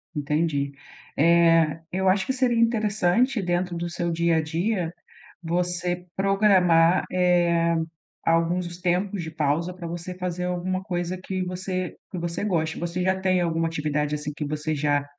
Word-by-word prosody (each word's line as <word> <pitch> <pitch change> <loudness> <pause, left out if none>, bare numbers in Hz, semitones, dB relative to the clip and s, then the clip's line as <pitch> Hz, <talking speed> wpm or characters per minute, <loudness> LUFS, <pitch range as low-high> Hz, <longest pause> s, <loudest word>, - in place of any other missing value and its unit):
Entendi, 145 -1 0 0.5
eh, 165 -1 +4
eu 190 +1 0
acho 190 +1 +3
que 265 - +1
seria 250 -3 +1
interessante 220 +1 +2
dentro 175 -1 -1
do 170 0 -3
seu 170 0 -2
dia 170 0 +2
a - - +2
dia 175 +2 -1 0.5
você 175 +1 -1
programar, 190 -4 +4
eh, 175 -2 +3 0.5
alguns 170 +1 0
tempos 185 +2 0
de 160 - -6
pausa 160 +3 -1
para 175 -2 -7
você 175 +2 -5
fazer 180 -1 -3
alguma 180 +1 -2
coisa 180 -1 -3
que 185 -1 -3
você 185 0 -4 0.2
que 190 - -6
você 170 +2 -3
goste, 165 -6 -1
você 175 +1 -2
já 190 +1 +1
tem 185 -1 +2
alguma 165 -1 0
atividade, 150 -1 -1
assim, 150 0 -4
que 150 - -4
você 150 +1 -2
já 145 -1 +1
175 Hz, 155 wpm, -25 LUFS, 165-185 Hz, 0.5 s, eh